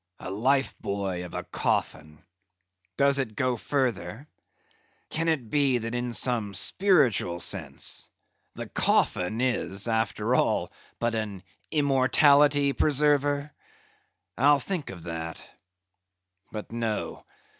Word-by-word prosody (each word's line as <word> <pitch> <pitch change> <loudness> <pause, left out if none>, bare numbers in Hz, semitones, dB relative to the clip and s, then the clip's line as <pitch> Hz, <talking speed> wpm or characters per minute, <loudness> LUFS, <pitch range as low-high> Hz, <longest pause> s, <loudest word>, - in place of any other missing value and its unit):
A 95 - -6
life 130 +7 +1
buoy 100 -3 -3
of 90 -1 -8
a - - -3
coffin! 75 +1 -3 0.7
Does 140 0 +4
it 115 -6 -3
go 130 +1 0
further? 120 - -2 0.8
Can 165 +1 -1
it 140 -9 -1
be 140 -4 +3
that 115 0 -4
in 120 0 -2
some 110 -6 +1
spiritual 125 - +3
sense - - -3 0.5
the - - -6
coffin 90 +5 +1
is, 105 -6 -1
after 115 0 0
all, - - +1 0.3
but 120 0 -1
an 105 -4 -4 0.3
immortality 145 0 +4
preserver! 145 0 +1 0.9
I'll 145 +1 +6
think 165 +2 -4
of 90 -4 -9
that. 80 -1 -6 1.0
But 105 0 -7
no. 115 -2 -3
120 Hz, 115 wpm, -27 LUFS, 100-140 Hz, 1.0 s, I'll